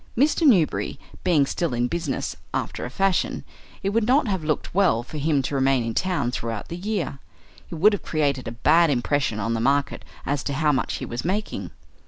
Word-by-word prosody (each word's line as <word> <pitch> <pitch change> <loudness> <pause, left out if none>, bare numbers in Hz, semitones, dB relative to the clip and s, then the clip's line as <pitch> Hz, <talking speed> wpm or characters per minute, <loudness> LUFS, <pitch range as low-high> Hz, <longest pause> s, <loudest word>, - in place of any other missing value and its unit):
Mr. 300 +4 +3
Newberry 185 - +2 0.2
being 165 -6 +4
still 150 -1 -2
in 120 +1 +1
business, 140 - -3 0.2
after - - -3
a - - -5
fashion, 195 +7 0 0.4
it 195 - 0
would 225 +1 +1
not 260 +1 +4
have 190 -5 -1
looked 155 -1 -2
well 175 - +3
for 150 +5 -7
him 145 -2 +1
to 135 - -3
remain 135 -2 +2
in 115 0 -3
town 180 -9 0
throughout 115 -3 -4
the 170 - -4
year. 185 -7 -3 0.5
It - - -6
would 205 +7 +5
have 205 - -2
created 140 -5 -1
a - - -3
bad 165 +2 +5
impression 135 -3 0
on 115 +3 -1
the 115 - -1
market 140 +3 +1 0.2
as 140 -1 -1
to 140 - -1
how 150 +2 +2
much 135 - -1
he - - -5
was 120 +1 -5
making. 205 +5 -2
150 Hz, 205 wpm, -24 LUFS, 130-185 Hz, 0.5 s, would